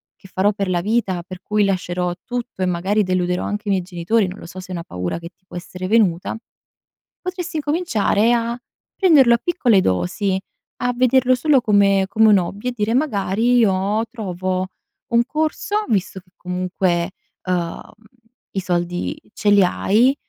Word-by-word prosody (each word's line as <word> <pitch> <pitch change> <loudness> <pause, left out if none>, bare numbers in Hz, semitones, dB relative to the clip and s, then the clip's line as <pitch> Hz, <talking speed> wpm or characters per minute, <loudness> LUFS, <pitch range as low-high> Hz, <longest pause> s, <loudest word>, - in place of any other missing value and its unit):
che 190 - -16
farò 195 +2 +2
per 195 -2 -2
la 175 -1 +1
vita, 200 -4 0
per 185 0 -10
cui 210 0 +1
lascerò 180 -2 -1
tutto 245 -5 -5
e 185 - +2
magari, 185 +4 +1
deluderò 180 -1 0
anche 210 0 -4
i - - +2
miei 190 -2 +2
genitori." 185 +4 0
Non 185 - -8
lo - - -10
so 180 +2 -9
se 185 - -9
è - - -7
una 170 -1 -4
paura 90 - -4
che 170 0 -9
ti 185 - -47
può - - -8
essere 180 +1 -6
venuta. 200 -3 +2 0.8
Potresti 365 -1 -5
incominciare 290 - +1
a 235 +1 -1 0.4
prenderlo 295 - +5
a - - 0
piccole 240 - +2
dosi, 140 - 0 0.4
a 245 0 +1
vederlo 255 +1 +3
solo 275 0 +3
come 200 -3 +3
come 220 +2 +4
un 205 - +6
hobby 200 +7 -5
e - - -2
dire 220 0 0
magari, 235 -3 +1
io 205 0 +2
trovo 185 -4 -3 0.5
un 235 0 +5
corso, 315 - -1
visto 200 -3 0
che 180 0 -25
comunque, 180 -1 -1 0.3
uhm, 175 -2 -2 0.7
i 195 - -2
soldi 175 -1 -2 0.2
ce 210 - 0
li 200 -1 +6
hai, 220 +8 +3
200 Hz, 170 wpm, -20 LUFS, 180-235 Hz, 0.8 s, un